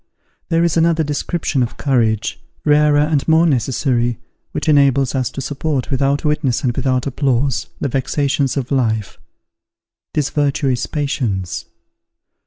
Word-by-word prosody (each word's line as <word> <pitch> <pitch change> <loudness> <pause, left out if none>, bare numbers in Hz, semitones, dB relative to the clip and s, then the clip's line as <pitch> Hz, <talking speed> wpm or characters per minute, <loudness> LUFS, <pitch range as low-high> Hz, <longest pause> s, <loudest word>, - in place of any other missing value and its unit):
There 165 -1 +2
is 170 -1 +1
another 165 0 +3
description 145 -1 -1
of 120 - -2
courage, 115 -6 0 0.3
rarer 150 0 +4
and 150 -1 +1
more 160 +1 +5
necessary, 125 -3 +1 0.3
which - - -4
enables 140 -3 +3
us 130 -3 0
to 135 - -6
support, 145 0 -2
without 140 +2 +1
witness 150 -3 0
and 120 -3 0
without 130 -2 0
applause, 135 -1 0
the - - -1
vexations 140 +1 0
of 130 -1 -3
life; 110 -6 0 1.0
this 145 -2 0
virtue 145 -1 +1
is 125 -1 -1
patience. 120 - -2
140 Hz, 135 wpm, -18 LUFS, 125-150 Hz, 1.0 s, more